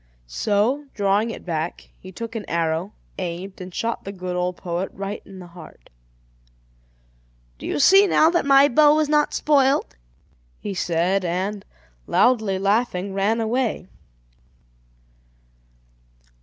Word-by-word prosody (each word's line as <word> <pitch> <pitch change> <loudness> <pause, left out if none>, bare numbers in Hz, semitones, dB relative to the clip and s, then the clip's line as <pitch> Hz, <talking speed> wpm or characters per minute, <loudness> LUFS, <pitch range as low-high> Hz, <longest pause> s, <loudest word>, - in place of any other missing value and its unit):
So, 210 - 0
drawing 205 +2 +1
it - - -8
back, 165 -1 -4
he 185 - -11
took 230 +4 -7
an 220 - -3
arrow, 165 +3 -1 0.3
aimed, 185 +2 -6
and 180 0 -8
shot 230 +6 -3
the 195 - -6
good 180 -2 -5
old 180 0 -2
poet 175 +2 -3
right 195 +2 -5
in 195 - -12
the 180 - -10
heart. 170 -2 -15 1.7
"Do - - -7
you - - -2
see 390 +7 +6
now 320 -3 +4
that 345 - +1
my 275 0 +6
bow 295 +2 +5
was 310 -1 +1
not 300 -1 +2
spoilt?" 275 - +2 0.6
he 205 - -5
said, 180 +2 0
and, 190 +4 -2 0.4
loudly 220 -6 +2
laughing, 195 -1 0
ran 200 +4 +1
away. 225 -4 -1
195 Hz, 130 wpm, -22 LUFS, 180-240 Hz, 1.7 s, see